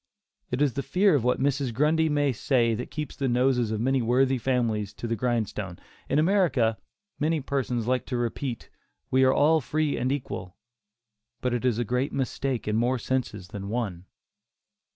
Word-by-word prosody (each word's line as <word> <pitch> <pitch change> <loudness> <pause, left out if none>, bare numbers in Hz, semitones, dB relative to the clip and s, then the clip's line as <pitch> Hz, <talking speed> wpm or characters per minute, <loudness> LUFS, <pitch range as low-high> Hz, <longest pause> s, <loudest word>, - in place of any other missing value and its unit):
It 125 +4 +1
is 140 -4 +1
the 140 - -2
fear 190 +7 +3
of 140 -6 +2
what 125 +1 +1
Mrs. 140 -1 0
Grundy 155 +4 +3
may 145 -2 +2
say 120 -1 +1
that 110 - -4
keeps 150 -3 -5
the 135 -1 -1
noses 125 -1 +2
of 110 -1 -2
many 130 +3 +2
worthy 130 +3 +2
families 115 -5 0
to - - -7
the 115 0 0
grindstone. 105 -5 -2 0.3
In - - +2
America 150 - +2 0.4
many 155 +2 +1
persons 130 -4 -2
like 125 +1 0
to 125 - -2
repeat 120 +1 -3 0.4
"we 130 +1 +4
are 130 - +5
all 155 +3 +4
free 155 +3 0
and 125 +2 0
equal," 125 -9 -4 0.8
but 125 -1 -1
it 120 +1 -1
is 120 -4 +2
a 120 - 0
great 125 +4 0
mistake 135 -2 -2
in 105 0 +1
more 125 +3 +2
senses 125 -7 -3
than 100 0 -6
one. 100 -6 -3
125 Hz, 180 wpm, -26 LUFS, 115-140 Hz, 0.8 s, are